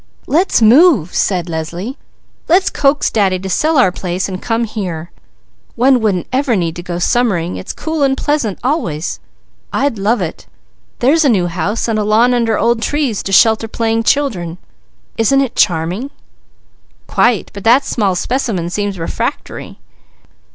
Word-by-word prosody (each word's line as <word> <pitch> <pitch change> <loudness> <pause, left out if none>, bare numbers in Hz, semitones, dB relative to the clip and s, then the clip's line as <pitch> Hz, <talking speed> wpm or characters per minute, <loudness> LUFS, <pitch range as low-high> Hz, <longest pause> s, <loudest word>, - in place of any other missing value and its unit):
"Let's 330 -6 +2
move," 235 - +5
said 180 -3 0
Leslie. 170 +9 -5 0.5
"Let's 375 +4 +3
coax 280 0 +1
Daddy 195 -4 +1
to 190 +1 -6
sell 310 - +1
our 245 -8 +4
place 185 +1 -3
and 185 -1 -6
come 230 0 -1
here. 180 -7 -5 0.6
One 255 +2 +4
wouldn't 200 -6 0
ever 260 -2 +1
need 175 -2 -2
go 175 -1 -4
summering, 180 -3 0
it's - - -6
cool 320 -1 -4
and 270 -1 +2
pleasant 290 -10 -1
always. 180 - -2 0.5
I'd 275 -6 -1
love 220 +5 +1
it! - - -5 0.5
There's 295 +7 +3
a 285 - +3
new 195 -7 +2
house 190 +7 -2
and 220 -2 0
a - - 0
lawn 225 +4 +3
under 230 -3 +1
old 230 +1 +1
trees, 275 -4 -1
to 195 - -5
shelter 225 +2 +4
playing 225 0 -1
children; 210 - 0 0.6
isn't 225 +5 +3
it 270 -3 -1
charming?" 180 - 0 1.0
"Quite! 235 -4 +1
But 200 - -8
that 245 +5 +5
small 200 -5 0
specimen 200 -6 -2
seems 205 0 -2
refractory." 165 - -5
220 Hz, 150 wpm, -15 LUFS, 185-260 Hz, 1.0 s, move